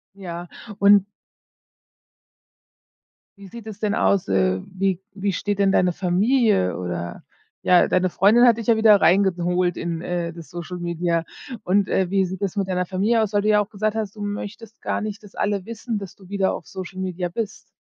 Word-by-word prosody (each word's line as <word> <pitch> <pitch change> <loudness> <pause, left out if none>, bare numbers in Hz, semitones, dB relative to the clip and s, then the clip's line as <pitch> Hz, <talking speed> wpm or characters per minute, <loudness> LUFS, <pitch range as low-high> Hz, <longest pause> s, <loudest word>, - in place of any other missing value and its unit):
Ja, 175 -3 -7 0.3
un 200 -1 +6 2.3
Wie 200 - -11
sieht 230 +3 -11
es 215 -2 -8
denn 210 -1 0
aus 200 -2 +2
äh, 95 -1 +2
wie 190 -1 0
wie 200 0 -1
steht 205 +3 -2
denn 195 -1 +3
deine 180 -2 +3
Familie, 195 - +2
oder, 85 -1 -5 0.4
ja, 180 -1 +5
deine 185 0 +2
Freundin 210 +7 +5
hat 235 -2 +5
dich 230 - -5
ja 230 - +4
wieder 215 -2 +6
reingeholt 180 -2 +2
in, 170 -1 -3
äh, 175 -1 -3
das 170 -2 -11
Social 175 0 -6
Media 170 -1 -1 0.4
und, 195 +2 +2
äh, 185 -2 +1
wie 195 -1 +2
sieht 190 +2 -7
das 195 -1 -2
mit 195 -1 -1
deiner 180 -1 0
Familie 210 +5 +1
aus, 215 -1 -2
weil 205 - +3
du 210 - 0
ja 210 -1 +5
auch 205 +1 -3
gesagt 215 +1 -1
hast, 215 -2 -3
du 210 - -7
möchtest 205 +2 -6
gar - - -1
nicht, 215 -1 -5
dass 205 -2 -15
alle 205 -2 -1
wissen, 225 +1 -4
dass 195 -1 -8
du 190 -2 -17
wieder 195 -1 0
auf - - -8
Social 190 0 -8
Media 180 -1 -3
bist? 215 +3 -5
195 Hz, 190 wpm, -22 LUFS, 180-210 Hz, 2.3 s, un